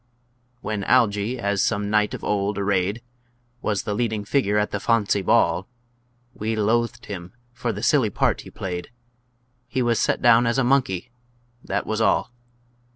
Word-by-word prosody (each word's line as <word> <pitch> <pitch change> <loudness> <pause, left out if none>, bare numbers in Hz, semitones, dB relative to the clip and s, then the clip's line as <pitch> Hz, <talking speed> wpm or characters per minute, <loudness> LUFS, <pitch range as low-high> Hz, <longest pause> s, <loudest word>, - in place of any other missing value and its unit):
When 105 -1 -3
Algy, 115 -1 +2
as 100 -4 0
some 100 0 0
knight 105 -1 +2
of - - -10
old 100 0 -1
arrayed, 100 +2 0 0.6
Was 105 -2 -1
the 105 - -2
leading 110 -2 -1
figure 105 -4 +1
at 105 0 0
the 105 - -2
"fawncy 105 -3 +1
ball," 95 +1 +2 0.7
We 110 +1 -2
loathed 115 +2 0
him 90 -2 -7 0.2
for 120 0 -2
the 105 +1 -6
silly 125 -3 +3
part - - 0
he - - -12
played, 90 -2 -5 0.8
He 125 0 -1
was 120 -1 +1
set - - +1
down 120 0 +5
as 115 - +1
a 135 - +3
monkey 125 -5 +1 0.5
that - - -2
was 110 0 -2
all! 110 +2 +2
105 Hz, 160 wpm, -23 LUFS, 100-120 Hz, 0.8 s, down